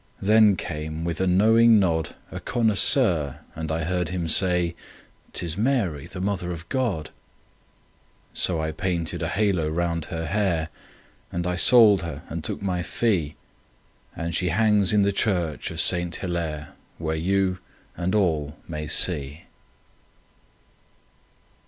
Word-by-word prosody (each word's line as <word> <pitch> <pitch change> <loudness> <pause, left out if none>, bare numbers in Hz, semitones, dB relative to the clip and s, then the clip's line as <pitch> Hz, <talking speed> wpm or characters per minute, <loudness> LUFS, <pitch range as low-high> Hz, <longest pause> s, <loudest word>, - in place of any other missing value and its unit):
Then 105 0 +5
came, 80 -1 -5
with 85 0 -3
a 95 - +1
knowing 110 +5 +5
nod, 80 -5 -1 0.2
A - - -6
connoisseur, 110 - +2 0.2
and 80 0 -5
I 80 +1 -2
heard 90 0 -2
him 90 -2 -3
say; 90 0 +3 0.6
"'Tis 85 -2 -2
Mary, 105 - -1
the 95 - -9
Mother 95 -2 -2
of 85 -1 -8
God." 110 -13 -2 1.2
So 85 -3 +1
I 80 0 -2
painted 85 -2 -3
a - - -1
halo 95 -7 0
round 85 0 -2
her 80 0 -5
hair, 85 -3 -1 0.6
And 85 0 -3
I 90 0 -1
sold 105 0 +6
her 80 -2 -7
and 80 -1 -5
took 70 - -2
my 90 -2 -1
fee, 90 -6 -1 0.8
And 85 0 -4
she 90 +2 +1
hangs 105 +1 +3
in 105 -1 +3
the 100 - +2
church 90 -6 -1
of 85 - -6
Saint 85 0 +3
Hillaire, 80 -5 -4 0.3
Where 80 -1 -3
you 95 +2 0 0.4
and 90 +3 -2
all 80 -7 0
may 75 -2 -5
see. 75 -1 +1
85 Hz, 140 wpm, -24 LUFS, 80-100 Hz, 1.2 s, sold